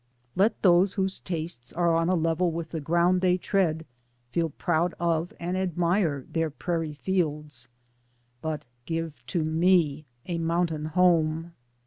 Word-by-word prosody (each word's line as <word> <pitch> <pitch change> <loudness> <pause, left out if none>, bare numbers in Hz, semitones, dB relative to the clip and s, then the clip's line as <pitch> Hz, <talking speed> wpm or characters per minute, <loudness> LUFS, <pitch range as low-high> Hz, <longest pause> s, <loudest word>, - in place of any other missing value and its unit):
Let 210 +4 +2
those 185 +1 +5
whose 190 -1 -1
tastes 165 -7 -4
are 170 -1 +2
on 165 +1 +2
a 185 - +3
level 165 +1 +1
with 165 0 -5
the 165 - -3
ground 175 +4 +2
they 180 -1 +3
tread 175 -4 0 0.5
feel 165 +1 0
proud 170 +3 0
of 170 0 0
and 175 +2 -2
ad 185 -3 -2
mire 170 -6 +1
their 165 -1 -1
prairie 165 0 -3
fields, 150 -8 -1 0.7
but 155 -2 -3 0.2
give 165 -2 -4
to 170 -4 0
me 160 -2 +2 0.2
a 170 -2 -2
mountain 165 -2 0
home. 165 -1 +2
170 Hz, 145 wpm, -27 LUFS, 155-180 Hz, 0.7 s, those